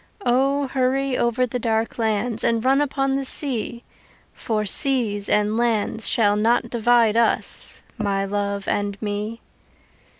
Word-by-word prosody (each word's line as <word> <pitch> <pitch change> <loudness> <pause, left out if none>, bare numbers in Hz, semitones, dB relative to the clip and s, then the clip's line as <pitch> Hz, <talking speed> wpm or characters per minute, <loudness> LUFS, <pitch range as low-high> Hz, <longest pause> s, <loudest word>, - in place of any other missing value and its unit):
O, 275 +3 +2
hurry 265 0 0
over 240 +1 +1
the 250 +1 -4
dark 225 0 -1
lands 220 +1 0
And 230 0 0
run 270 +2 +3
upon 270 -1 0
the 275 - -2
sea 245 -3 -2 0.5
For 215 -2 -2
seas 220 -4 +2
and 210 +1 +2
lands 225 -1 0
shall 205 -3 +2
not 230 +2 +1
divide 235 -1 +3
us 235 0 0 0.2
My 200 -2 0
love 200 0 -3
and 205 -1 -2
me. 210 +2 -4
230 Hz, 135 wpm, -22 LUFS, 210-255 Hz, 0.5 s, run